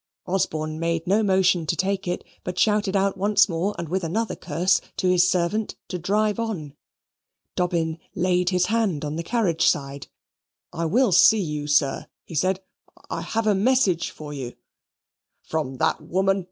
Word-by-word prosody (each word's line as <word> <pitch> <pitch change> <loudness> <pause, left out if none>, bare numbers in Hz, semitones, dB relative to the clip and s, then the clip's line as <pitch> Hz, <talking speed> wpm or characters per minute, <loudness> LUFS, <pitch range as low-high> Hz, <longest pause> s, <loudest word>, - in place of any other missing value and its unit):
Osborne 155 -4 -2
made 165 0 -1
no 200 +4 +3
motion 190 -4 +2
to 170 - +1
take 195 +1 -1
it, 175 - -2 0.2
but 180 - -5
shouted 210 -2 +2
out 195 -1 +1
once 205 +2 +4
more 185 +3 -2
and 170 - -4
with 185 +3 -2
another 215 +8 -1
curse 185 +3 +1 0.2
to 185 - 0
his 180 0 +4
servant 185 +5 0
to 180 - -4
drive 210 +5 0
on. 175 -11 -4 0.8
Dobbin 170 -2 -1 0.2
laid 180 0 +1
his 180 -1 +2
hand 210 -9 0
on 150 +1 -3
the 165 - -2
carriage 175 -4 +1
side. 140 -1 -1 0.7
"I 165 - -2
will 230 +7 +3
see 220 +5 +6
you, 150 -5 -3
sir," 145 -2 +1 0.2
he - - -11
said. 185 +5 0 0.5
"I - - -2
have 225 0 -2
a 210 - +4
message 200 -4 +2
for 150 -1 -9
you." 130 -4 -6 0.9
"From 140 -5 -3
that - - +1
woman?" 195 +2 +1
180 Hz, 165 wpm, -24 LUFS, 160-200 Hz, 0.9 s, see